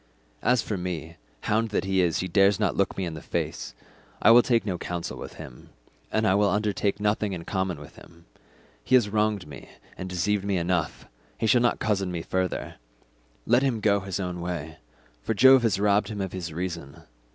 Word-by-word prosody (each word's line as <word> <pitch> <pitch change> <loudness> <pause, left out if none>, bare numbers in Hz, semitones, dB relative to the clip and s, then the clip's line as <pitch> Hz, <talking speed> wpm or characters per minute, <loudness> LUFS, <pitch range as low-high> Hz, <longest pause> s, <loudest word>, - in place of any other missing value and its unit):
"As 125 -2 +2
for 105 - -3
me, 85 -2 -5 0.2
hound 110 +2 0
that 105 - -1
he 95 -1 +2
is, 85 -3 +1
he 95 - -3
dares 100 +1 +3
not - - +1
look 100 - 0
me 95 - -1
in 85 - -4
the 80 - -8
face. - - -4 0.4
I - - +6
will 120 +1 +9
take 115 -3 +1
no 90 -4 -2
counsel 85 -1 -4
with - - -9
him, 60 -2 -11 0.4
and 110 0 +1
will 100 0 +3
undertake 105 -1 0
nothing 105 -1 0
in 85 -2 -6
common 95 -5 -2
with 75 - -13
him. 85 0 -16 0.6
He 130 - +3
has 120 -5 +4
wronged 105 -2 0
me 70 -2 -11 0.3
and 95 - -6
deceived 95 +3 0
me 100 -2 0
enough, 85 -4 -1 0.3
he 115 - -1
shall 120 +2 +4
not 120 - +2
cozen 100 -4 -1
me 85 -2 -4
further; 95 -1 -2 0.7
let 120 +3 +4
him 130 -5 0
go 100 -1 +3
his 95 0 -4
own 90 -2 -4
way, 80 -3 -5 0.4
for 115 - -2
Jove 130 +4 +7
has 110 -5 +1
robbed 105 0 +3
him 105 -2 -6
of 95 -2 -3
his 90 -3 -5
reason. 85 -2 -6
95 Hz, 200 wpm, -26 LUFS, 85-105 Hz, 0.7 s, will